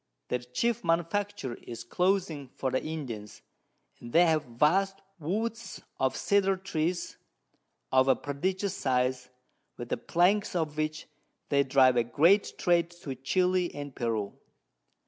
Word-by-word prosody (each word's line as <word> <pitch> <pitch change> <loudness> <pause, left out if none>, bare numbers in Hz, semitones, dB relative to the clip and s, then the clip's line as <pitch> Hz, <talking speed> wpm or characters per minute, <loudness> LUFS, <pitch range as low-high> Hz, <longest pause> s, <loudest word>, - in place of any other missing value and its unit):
Their 125 - 0
chief 125 - -1
Manufacture 170 -2 -1
is 115 -1 -8
Clothing 175 -1 0
for 130 - -2
the 130 - 0
Indians, 125 -10 -6 0.6
and 120 - -10
they 175 +2 +6
have 160 -2 +2
vast 180 +11 +2 0.2
Woods 220 +8 -3 0.2
of 130 0 +1
Cedar 195 -1 +2
Trees 175 -2 -2 0.7
of 130 0 +4
a 130 - +5
prodigious 185 +7 -2
size, 125 -1 0 0.5
with 120 -1 -7
the - - 0
Planks 185 +4 +2
of 160 -3 -1
which 155 0 -2 0.4
they 140 -1 +4
drive 130 -2 +4
a 120 - +4
great 165 - +3
Trade 170 -2 +2
to 135 - -4
Chili 180 +7 +1
and 145 -2 -7
Peru. 110 -4 -2
155 Hz, 135 wpm, -29 LUFS, 130-185 Hz, 0.7 s, they